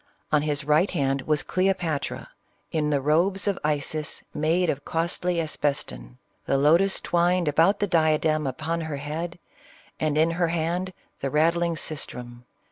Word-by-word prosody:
On 150 -1 +4
his 145 -1 -1
right 150 +6 +3
hand 135 -5 0
was 150 -2 +2
Cleopatra, 180 -5 -1 0.4
in 150 -2 0
robes 160 +8 +1
of 200 - 0
Isis 150 0 -1
made 165 +4 +1
of 145 -2 -2
costly 170 +1 -1
asbeston, 100 - -3
— - - -43
the 135 - +2
lotus 170 +8 +4
[twined 175 0 +1
about 165 +7 +4
the 205 - +2
diadem 155 -3 +2
upon 155 +6 -2
her 155 -3 -4
head, 160 +5 -5 0.6
and 150 -1 0
in 160 +2 +3
her 170 0 +1
hand, 170 +3 -2 0.3
the 135 - -2
rattling 170 +3 +2
sistrum. 125 -6 -4
155 Hz, 145 wpm, -25 LUFS, 145-170 Hz, 0.6 s, On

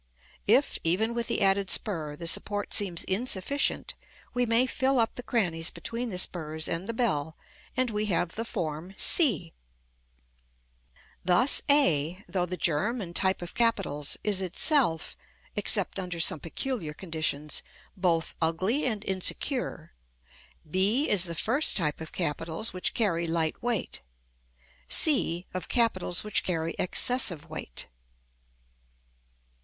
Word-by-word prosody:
If, 250 +7 +3
even 205 +8 +1
with 235 -1 -3
the - - 0
added 195 0 +2
spur, 155 -8 -2
the 170 - -8
support 205 +4 0
seems 185 -5 +1
insufficient, 230 +6 0 0.4
we 245 0 0
may 230 +3 +3
fill 265 +1 0
up 225 - 0
the - - -5
crannies 175 -10 0
between 235 +1 -5
the 185 - -5
spurs 160 -3 -1
and 170 +5 -3
the - - -2
bell, 160 - -1 0.4
and 255 -2 +1
we 210 0 -2
have 175 -3 0
the 225 - -4
form 165 -3 -5
c. 220 - +3 1.7
Thus 185 +10 +5
a, 185 - +3
though 180 0 -2
the 180 +1 -5
germ 190 +11 0
and 175 -5 -7
type 190 -2 +1
of 175 - -7
capitals, 195 -11 +1
is 205 -3 +3
itself 185 - +2 0.4
(except 200 -1 +3
under 180 -2 -5
some 160 - +3
peculiar 165 - -4
conditions) 155 -4 -2 0.3
both 170 -4 0
ugly 185 - +1
and 215 -3 -3
insecure; 190 - -1 0.7
b 200 - +2
is 190 -4 +5
the 170 -1 -5
first 265 - +3
type 155 -4 -2
of 160 - -7
capitals 165 +5 -2
which 185 - -1
carry 170 -7 +1
light 165 -1 -1
weight; 240 - -2 0.9
c, 185 - +3
of 185 - -5
capitals 190 -7 +1
which 210 -1 +2
carry 165 -2 -2
excessive 185 - +2
weight. - - -5
185 Hz, 135 wpm, -27 LUFS, 165-230 Hz, 1.7 s, Thus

